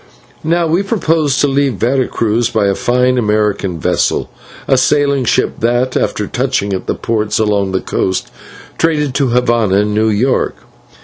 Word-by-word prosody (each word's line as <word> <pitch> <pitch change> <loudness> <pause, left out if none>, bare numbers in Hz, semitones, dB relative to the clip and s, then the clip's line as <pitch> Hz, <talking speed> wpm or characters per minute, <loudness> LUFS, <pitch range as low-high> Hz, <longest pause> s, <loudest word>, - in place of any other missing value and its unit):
Now 170 +2 +1
we 165 +4 +1
purposed 160 - 0
to 145 - +3
leave 135 -2 +1
Vera 125 +5 0
Cruz 115 +1 0
by 110 -2 0
a 100 - +2
fine 125 +4 +1
American 105 -4 0
vessel, - - 0 0.4
a 135 - +3
sailing 140 0 +2
ship, - - 0
that, 120 +2 0
after 105 - -1
touching 125 -4 -1
at 95 - -4
the - - -1
ports 110 -2 -1
along 105 -3 0
the 95 - -1
coast, 95 0 -2 0.5
traded 150 -4 +1
to 135 0 +1
Havana 115 -5 +2
and 105 0 -1
New 110 +1 +2
York. 115 +5 0
120 Hz, 165 wpm, -14 LUFS, 105-140 Hz, 0.5 s, to